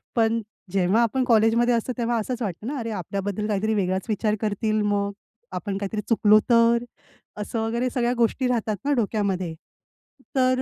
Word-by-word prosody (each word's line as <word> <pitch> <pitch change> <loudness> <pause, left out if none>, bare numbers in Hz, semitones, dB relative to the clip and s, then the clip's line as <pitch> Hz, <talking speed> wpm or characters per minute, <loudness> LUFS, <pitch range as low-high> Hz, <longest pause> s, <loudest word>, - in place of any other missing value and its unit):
पण 230 0 +2 0.3
जेव्हा 195 +4 +3
आपण 245 +3 +1
कॉलेजमध्ये 235 +1 +4
असतो 235 +2 -1
तेव्हा 235 0 0
असंच 245 +3 -4
वाटतं 205 +1 -4
ना. 285 +1 -3
"अरे, 230 -1 -4
आपल्याबद्दल 200 +2 -3
काहीतरी 215 +1 0
वेगळाच 190 -2 0
विचार 215 0 +1
करतील 215 0 0
मग? 205 -1 0 0.4
आपण 195 -2 -3
काहीतरी 205 +1 -3
चुकलो 215 -1 +5
तर?" 235 0 +5 0.6
असं 225 +2 -3
वगैरे 235 +3 0
सगळ्या 245 -1 0
गोष्टी 240 +2 +1
राहतात 225 -3 0
ना 290 - +2
डोक्यामध्ये. 200 -7 -1 0.8
तर 255 0 +3
220 Hz, 160 wpm, -24 LUFS, 205-235 Hz, 0.8 s, चुकलो